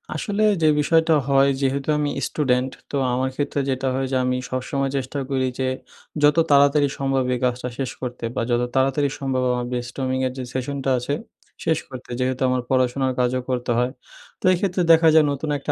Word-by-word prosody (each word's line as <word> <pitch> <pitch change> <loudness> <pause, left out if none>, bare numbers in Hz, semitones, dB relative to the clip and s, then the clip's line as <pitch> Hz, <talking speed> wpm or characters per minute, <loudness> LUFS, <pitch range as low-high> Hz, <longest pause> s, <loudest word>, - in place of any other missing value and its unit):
আসলে, 205 0 -1 0.2
যে 155 - +4
বিষয়টা 160 +2 +3
হয় 140 0 +4
যেহেতু 135 +1 -1
আমি 150 -1 0 0.2
স্টুডেন্ট, 130 -3 0 0.2
তো - - -3 0.2
আমার 130 +1 0
ক্ষেত্রে 145 0 -2
যেটা 135 0 -1
হয় 135 0 -1
যে - - 0
আমি 125 0 0
সবসময় 135 +2 -2
চেষ্টা 135 +2 -3
করি 130 -1 0
যে 130 - 0 0.6
যত 145 +1 +5
তাড়াতাড়ি 145 +1 +5
সম্ভব 135 -1 +1
এই 125 - -2
কাজটা 125 0 -2
শেষ 135 -2 -2
করতে 125 -2 -6
বা, - - 0
যত 120 0 +2
তাড়াতাড়ি 135 +2 +2
সম্ভব 135 -2 -1
আমার 125 0 -1
brainstorming 130 +2 -2
এর - - -4
যে 130 - -4
session 130 +2 -3
টা - - +2
আছে 125 +4 -3 0.5
শেষ 160 - +3
করতে। 130 -1 -10
যেহেতু 130 0 -1
আমার 125 0 +1
পড়াশোনার 130 0 +1
কাজও 125 +1 +1
করতে 125 -1 -1
হয়। 125 +1 0 0.5
তো - - -7
এইক্ষেত্রে 185 0 0
দেখা 165 0 +6
যায় 155 -1 +6
নতুন 140 +2 -4
একটা 140 +1 -3
135 Hz, 190 wpm, -22 LUFS, 125-145 Hz, 0.6 s, দেখা